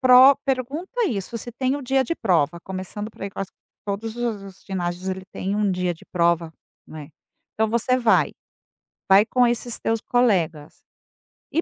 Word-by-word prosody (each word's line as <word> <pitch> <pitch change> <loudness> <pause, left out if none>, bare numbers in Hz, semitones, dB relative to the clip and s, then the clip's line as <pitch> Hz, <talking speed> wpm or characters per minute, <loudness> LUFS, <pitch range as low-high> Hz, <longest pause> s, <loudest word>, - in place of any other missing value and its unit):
Pro 255 +1 +8
pergunta 290 - -1
isso, 215 - -3
se 240 - -7
tem 260 +3 -1
o 290 - -6
dia 265 +1 +2
de 335 - -2
prova, 170 - +1
começando 190 +3 -6
por, - - -13
aí, 200 - -3
que - - -13
acho 195 -1 -3
que - - -64 0.3
todos 215 +3 -3
os 235 -4 -2
os 195 -1 -13
ginásios, 180 -1 -3
ele 190 0 -3
tem 195 +2 -2
1 210 -1 +2
dia 180 -1 -1
de 160 - -18
prova, 170 -2 +1 0.3
né, 150 -2 -9 0.5
então, 220 0 +1
você 235 +2 +2
vai, 235 -3 +3 0.8
vai 195 +2 +8
com 250 +1 +3
esses 240 0 -1
teus 225 0 0
colegas 175 -11 0 0.7
e 330 - +1
210 Hz, 180 wpm, -23 LUFS, 185-250 Hz, 0.8 s, Pro